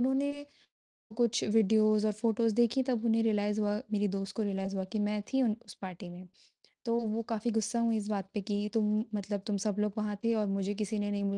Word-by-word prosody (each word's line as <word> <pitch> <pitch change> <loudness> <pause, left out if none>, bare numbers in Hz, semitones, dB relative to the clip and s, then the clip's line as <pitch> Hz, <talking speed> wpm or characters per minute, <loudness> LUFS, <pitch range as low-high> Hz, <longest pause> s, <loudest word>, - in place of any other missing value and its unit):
उन्होंने 285 +3 0 0.7
कुछ 235 -2 +2
वीडियोज़ 215 0 +4
और 215 - +2
फ़ोटोज़ 225 +1 +1
देखी 240 +3 +3
तब 250 -3 -1
उन्हें 225 -1 +3
रियलाइज़ 210 -1 +1
हुआ 205 -1 +1 0.2
मेरी 205 0 +2
दोस्त 195 0 -4
को 220 - 0
रियलाइज़ 195 -1 -2
हुआ 190 - -1
कि 215 - -1
मैं 210 0 -1
थी 265 0 +3
उन 220 -3 +2
उस 205 - -12
पार्टी 185 -1 -7
में, 180 +1 -10 0.6
तो 235 0 +1
वो 225 0 -1
काफ़ी 225 +1 0
गुस्सा 225 +1 0
हुई 230 -1 +2
इस 210 -1 -3
बात 200 -2 -2
पर 210 - 0
कि 205 +1 -2
तुम 215 -1 +2
मतलब 205 0 -2
तुम 205 -2 0
सब 205 -2 0
लोग 210 -1 +1
वहाँ 210 -1 -1
थे 230 0 +3
और 215 -1 +1
मुझे 195 0 -1
किसी 210 0 -2
ने 205 0 -1
नहीं 200 0 -1
210 Hz, 225 wpm, -31 LUFS, 205-225 Hz, 0.7 s, वीडियोज़